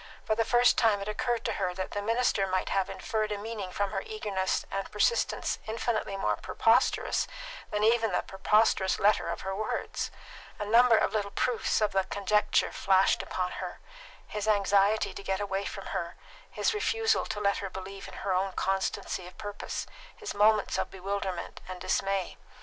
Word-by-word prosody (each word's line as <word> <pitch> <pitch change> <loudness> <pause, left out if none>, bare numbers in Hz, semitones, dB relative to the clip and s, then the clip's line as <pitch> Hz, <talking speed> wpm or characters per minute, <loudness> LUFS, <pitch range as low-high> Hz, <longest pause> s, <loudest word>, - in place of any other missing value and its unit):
For - - +2
the 225 +1 +2
first 240 +2 +4
time 220 -4 +4
it 200 - -5
occurred 235 +2 -1
to 225 - +1
her 180 -1 0
that 185 0 -4
the 205 - -2
minister 225 -2 +1
might 185 0 -1
have 195 -1 0
inferred 215 -1 -2
a 205 - -1
meaning 205 -3 -5
from 200 +1 -1
her 195 -2 -2
eagerness 200 -3 -2
and 195 0 -3
persistence 470 - +1
infinitely 220 -2 -1
more - - 0
preposterous - - +2 0.4
than 210 0 -1
even 225 -1 +3
the - - 0
preposterous 195 0 +2
letter 205 -3 +3
of 170 - -3
her 190 0 -3
words. 215 +2 -2 0.5
A 210 - -3
number 230 +2 +6
of - - +1
little 205 -2 0
proofs 230 +2 0
of 210 - +2
the 190 0 +2
conjecture 205 +1 +1
flashed 190 0 +3
upon 180 -1 -3
her: - - -6 0.5
his 210 0 -4
anxiety 205 0 +3
to - - -7
get 190 -1 -1
away 200 -1 -2
from - - -6
her, - - -3 0.3
his - - 0
refusal 450 +1 +1
to 210 - -3
let 200 -1 +2
her 195 - -4
believe 190 +1 -8
in - - -10
her 195 - +1
own 190 +1 0
constancy 190 -1 -2
of 180 - -14
purpose, 205 -1 -5 0.3
his 430 -3 -5
moments 210 +1 +3
of - - -1
bewilderment 195 -1 -4
and 185 -1 -6
dismay. 190 +1 -1
205 Hz, 180 wpm, -29 LUFS, 195-220 Hz, 0.5 s, number